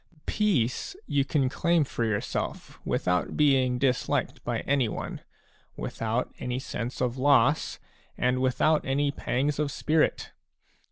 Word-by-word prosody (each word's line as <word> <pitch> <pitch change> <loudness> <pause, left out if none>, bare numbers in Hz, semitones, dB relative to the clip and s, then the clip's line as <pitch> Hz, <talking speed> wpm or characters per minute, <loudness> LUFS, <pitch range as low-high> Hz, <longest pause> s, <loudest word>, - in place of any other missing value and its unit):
Peace 200 - 0
you 140 - +1
can 135 -1 +1
claim 170 +4 +2
for 125 -3 -3
yourself 105 -3 -3
without 90 0 0
being 135 -4 +3
disliked 125 -1 0
by - - -2
anyone, 135 -5 -1 0.6
without 115 +3 -2
any 125 0 -2
sense 125 -2 -5
of 125 0 -1
loss, 140 +1 +3 0.4
and 125 +1 +1
without 140 +4 +2
any 140 +2 +1
pangs 140 +1 -1
of 150 -2 0
spirit. 155 +2 +1
130 Hz, 120 wpm, -27 LUFS, 125-145 Hz, 0.6 s, being